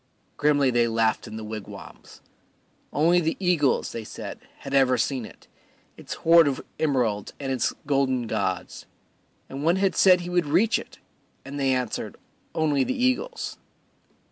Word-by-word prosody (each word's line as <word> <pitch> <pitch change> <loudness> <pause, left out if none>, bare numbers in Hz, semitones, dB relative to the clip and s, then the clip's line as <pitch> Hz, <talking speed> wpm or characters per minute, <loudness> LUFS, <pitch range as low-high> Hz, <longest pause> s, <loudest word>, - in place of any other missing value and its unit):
Grimly 145 -3 +3
they 120 -1 +3
laughed 115 0 0
in 110 0 -7
the 110 - -6
wigwams. 110 -1 -10 0.7
Only 170 +4 +3
the 160 0 -1
eagles, 175 -7 +1
they 115 - -5
said, - - -8 0.2
had 135 - -7
ever 130 -2 +4
seen 130 -3 -1
it, - - -15 0.5
its - - -7
hoard 165 -1 +5
of 140 - -2
emeralds 125 -9 0
and 135 -2 -3
its 130 -3 0
golden 135 -3 +1
gods; 95 -4 -3 0.6
and 135 +2 -6
one 165 +3 +3
had 190 -1 +1
said 185 -2 +5
he 175 - -6
would 175 -3 +1
reach 215 +10 +3
it, - - -12 0.5
and 140 +1 -6
they 135 -1 +2
answered, 125 -3 -2 0.4
"Only 150 -4 +2
the 260 - -2
eagles." 255 - -1
140 Hz, 155 wpm, -25 LUFS, 125-165 Hz, 0.7 s, hoard